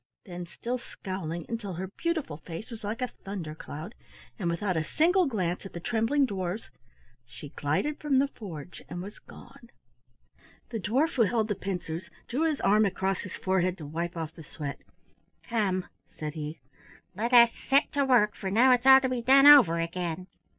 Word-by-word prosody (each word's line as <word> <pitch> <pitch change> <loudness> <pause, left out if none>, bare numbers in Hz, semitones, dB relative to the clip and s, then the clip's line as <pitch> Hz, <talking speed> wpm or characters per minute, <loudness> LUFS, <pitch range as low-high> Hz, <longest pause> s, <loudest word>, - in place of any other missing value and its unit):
Then, 175 -2 -7
still 245 +8 -4
scowling 175 -7 -6
until 225 -5 -4
her 180 +3 -4
beautiful 320 - -2
face 170 +8 -8
was 225 -2 -8
like 220 +4 -3
a - - 0
thunder 185 -6 -7
cloud, 155 +5 -8 0.5
and 175 -4 -1
without 180 +2 -1
a 160 - +1
single 350 - +3
glance 180 -8 -2
at 195 - -10
the 170 - -5
trembling 235 +9 +1
dwarfs, 190 -2 -4 0.6
she 125 +4 -10
glided 155 - -1
from 290 -3 +1
the 275 +2 +4
forge 180 - -9
and 175 0 -5
was 205 +2 -10
gone. - - -15 1.0
The 230 - -3
dwarf 265 - +1
who - - +4
held 220 0 +2
the - - +2
pincers 175 -3 -5 0.2
drew 310 +7 +1
his 300 - -2
arm 210 +2 +4
across 195 -1 -1
his 185 - -7
forehead 185 -1 0
to 155 - -8
wipe 170 +4 -4
off 160 -1 -4
the 160 - -11
sweat. 145 -1 -6 0.6
"Come," 195 -6 0 0.2
said 150 -1 -6
he, 155 0 -6 0.5
"let 225 +6 -2
us 235 -2 +7
set 275 +2 +1
to 285 - +1
work, 235 -6 +4
for 195 - -5
now 240 +6 +5
it's 250 +1 +3
all 265 0 +10
to 260 - +1
be 250 -2 -2
done 270 +3 +6
over 255 - +8
again." 170 +1 -3
195 Hz, 185 wpm, -28 LUFS, 170-245 Hz, 1.0 s, all